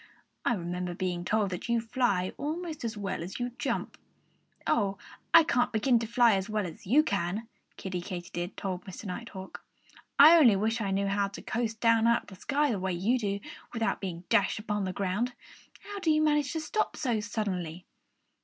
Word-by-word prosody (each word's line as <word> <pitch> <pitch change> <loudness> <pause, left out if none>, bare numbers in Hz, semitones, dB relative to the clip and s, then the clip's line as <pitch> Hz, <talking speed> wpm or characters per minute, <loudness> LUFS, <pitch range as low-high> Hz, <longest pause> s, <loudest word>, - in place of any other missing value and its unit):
I 240 - +2
remember 180 -1 -4
being 180 -1 -2
told 205 +1 +1
that 180 +6 -5
you 235 0 +3
fly 225 -6 0
almost 315 +1 -4
as 225 -2 -3
well 195 -4 -3
as 180 +6 -6
you 245 0 -2
jump." - - -2 0.7
"Oh, 200 -3 +1 0.3
I 330 0 +9
can't 245 -5 +1
begin 235 +2 +3
to 230 - -3
fly 235 0 +5
as 195 +1 -1
well 215 -2 0
as 170 +1 -9
you 285 +9 +5
can," 200 - -2 0.3
Kiddie 185 -2 -4
Katydid 175 0 -5
told 185 -2 -3
Mr. 190 +3 -9
Nighthawk. 190 0 -7 0.5
"I 315 +4 +10
only 240 -9 +7
wish 220 +4 0
I 200 - -1
knew 195 +1 +1
how 200 0 +1
to 195 - -9
coast 225 -1 -2
down 230 -1 +4
out 235 0 +3
of - - -24
the 190 - -11
sky 290 0 +1
the 205 - -1
way 185 0 -1
you 215 +9 +1
do, 200 -2 -2 0.3
without 225 -2 -1
being 175 -3 -5
dashed 200 - +3
upon 210 -2 -2
the 185 - -2
ground.... 200 +6 -1 0.5
How 405 0 -7
do 355 - 0
you 310 0 +4
manage 295 -2 +2
to 320 - -2
stop 430 +7 -1
so 240 -6 0
suddenly?" 185 -6 -3
210 Hz, 195 wpm, -29 LUFS, 190-240 Hz, 0.7 s, I